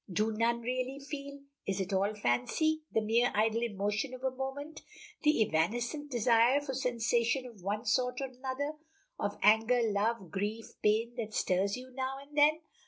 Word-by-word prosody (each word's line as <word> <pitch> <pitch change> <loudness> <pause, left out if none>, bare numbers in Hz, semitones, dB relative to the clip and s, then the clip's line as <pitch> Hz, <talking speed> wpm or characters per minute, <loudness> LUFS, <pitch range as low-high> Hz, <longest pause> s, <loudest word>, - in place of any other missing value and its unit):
Do 215 +5 +1
none 230 +2 +1
really 255 +2 -2
feel? 280 0 -7 0.3
Is 195 -1 -1
it 190 +1 -2
all 200 +3 +1
fancy 210 - +1
the 225 - +2
mere 230 +3 +3
idle 220 +2 +2
emotion 215 +3 -1
of 255 - -12
a 260 -1 -1
moment 275 +4 -5 0.4
the 300 -7 +4
evanescent 240 - -1
desire 240 +1 +4
for 285 -2 -5
sensation 240 0 +1
of 230 -6 -11
one 205 +5 -2
sort 250 +3 +1
or 275 - -1
another 265 +3 -4 0.5
of - - -2
anger, 225 +3 +5
love, 210 -3 0
grief, 210 +4 -3
pain, 220 +3 +2
that 220 -2 -4
stirs 195 +3 +1
you 255 +1 -10
now 265 +1 -3
and 280 +1 -14
then? 305 +2 +5
235 Hz, 170 wpm, -32 LUFS, 215-265 Hz, 0.5 s, anger